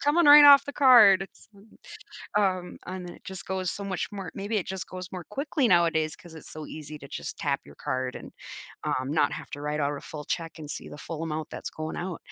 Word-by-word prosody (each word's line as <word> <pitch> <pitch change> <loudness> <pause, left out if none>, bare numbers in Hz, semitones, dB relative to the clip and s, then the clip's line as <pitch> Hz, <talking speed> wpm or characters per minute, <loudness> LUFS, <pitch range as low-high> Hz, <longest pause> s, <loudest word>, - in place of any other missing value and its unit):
coming 300 +2 +4
right 290 0 +10
off 280 -1 +9
the 285 - -6
card. 215 -8 +7
So, 200 -2 -21 0.8
uh, - - +4
um, 185 -2 -1
and 180 -1 -6
it - - -15
just 190 0 -8
goes 190 -1 -2
so 200 - -6
much 190 -2 -3
more 195 -5 -6
Maybe 205 +2 -2
it 190 - -3
just 190 -1 -5
goes 185 0 -8
more 180 -3 -7
quickly 280 +2 0
nowadays 165 -4 +2
cause 170 -2 -15
it's 160 - -12
so 155 -1 -8
easy 155 -1 -8
to 140 - -11
just - - -7
tap - - -1
your 70 - -15
card, 130 - -3
and, - - -9 0.5
um, 130 +2 -1
not 150 -2 +2
have - - -8
to 145 - -6
write 150 +1 -2
out 145 +1 0
a - - -10
full 150 -1 -8
check 165 -1 -3
and 150 -1 -9
see - - -7
the - - -10
full 165 +2 -6
amount 155 -1 -4
that's - - -6
going 155 0 -5
out. 175 -1 -4
180 Hz, 240 wpm, -27 LUFS, 155-200 Hz, 0.8 s, right